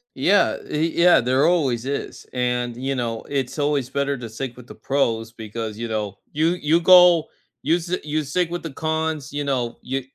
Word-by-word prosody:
Yeah, 200 +2 +3
eh, 155 +2 0
yeah, 175 +1 +5
there 130 +3 +2
always 135 -9 +1
is, 140 0 -5
and, 125 -1 -1
you 135 +2 -2
know, 115 -2 -3
it's 135 0 -3
always 145 -3 0
better 140 +1 -1
to 120 -2 -7
stick 120 +3 -6
with 125 -1 -13
the - - -11
pros 115 -5 -1
because, 110 -1 -6
you 115 - -3
know, 105 -3 -3
you 160 +3 +2
you 155 +3 +3
go, 180 -2 +7 0.4
you 160 +4 +3
s 175 +1 -3
you 155 0 -2
stick 170 +5 -1
with 175 0 -5
the 165 - -5
cons, 160 -1 -2
you 145 0 -2
know, 125 -4 -1
you 135 +1 -3
140 Hz, 195 wpm, -22 LUFS, 120-160 Hz, 0.4 s, go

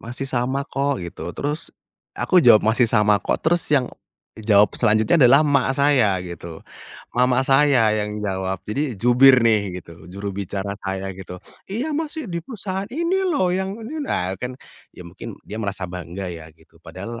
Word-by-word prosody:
masih 120 +4 -5
sama 130 +1 -1
kok 140 -8 -2
gitu 85 - -7
terus 150 +3 -3 0.5
aku 185 - +3
jawab, 120 -8 +6
"masih 115 +2 +3
sama 105 -2 +3
kok" - - -1
Terus 175 +1 +3
yang 135 -4 +1 0.5
jawab 105 -1 +4
selanjutnya 110 +9 +3
adalah 140 +5 +6
emak 140 -3 +2
saya 135 -9 +3
gitu, 85 -2 -9 0.6
mama 125 +1 +3
saya 135 -5 +4
yang 105 0 -3
jawab 95 -1 -2
jadi 130 0 -2
jubir 125 +2 +6
nih 100 -5 +1
gitu 85 0 -15
juru 100 0 -5
bicara 100 0 -4
saya 95 0 -4
gitu, 90 -1 -9 0.3
"Iya 250 +10 -3
masih 315 -4 -4
di 170 - -2
perusahaan 195 -4 -5
ini 340 - -1
loh 290 - +1
yang 190 +2 -2
ini" 295 +8 -6
Nah 90 +1 -1
kan 125 +1 -5 0.4
ya 90 - -10
mungkin 105 +4 -10
dia 105 - -8
merasa 100 -3 -3
bangga 90 +1 -6
ya 80 -1 -10
gitu 80 +1 -25
padahal 100 +8 -8
115 Hz, 165 wpm, -21 LUFS, 95-145 Hz, 0.6 s, jawab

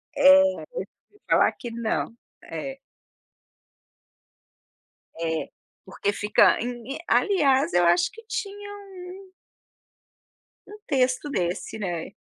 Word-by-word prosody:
É, 285 0 +8
eu - - +4
já - - +4 0.7
ouvi 415 - -26
falar - - +4
que 240 - -8
não, 230 0 -2 0.3
é. 270 -1 -6 2.4
É, 160 -1 -2 0.4
porque 195 +1 -2
fica 210 +1 +4
e - - -2
em, 245 +2 -5
aliás 285 -9 +3
eu 175 0 +4
acho 175 +1 +3
que 455 - -13
tinha 410 -2 -5 0.5
um 380 -1 -14 1.3
Um 420 - -11
texto 255 0 +1
desse, 180 -3 -2
né. 175 -5 -4
255 Hz, 115 wpm, -25 LUFS, 200-295 Hz, 2.4 s, É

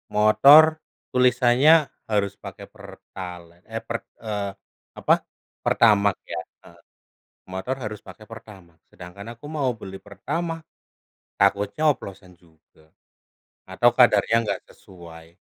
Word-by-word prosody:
motor 135 +9 +7 0.5
tulisannya 125 +3 +4 0.4
harus 100 -2 0
pakai - - -9
pertalite, 90 -2 -11
eh 115 - -4
per 115 - -2 0.3
eee, 105 -2 -3 0.5
apa, - - +3 0.5
pertamax, 105 -3 +3 0.2
ya. - - -3 0.2
Heeh. - - -18 0.7
Motor 95 +8 -3
harus 105 -1 -6
pakai 95 +3 -13
pertamax, 95 -7 -14
sedangkan 90 +4 -12
aku 130 - -23
mau 135 -4 0
beli 95 0 -9
pertamax, 165 - -5 0.8
takutnya 100 +7 +1
oplosan 95 -7 -7
juga. 80 -2 -27 0.8
Atau 120 +6 +3
kadarnya 115 -2 +4
nggak - - -3
sesuai. 85 -3 -15
100 Hz, 110 wpm, -23 LUFS, 95-120 Hz, 0.8 s, motor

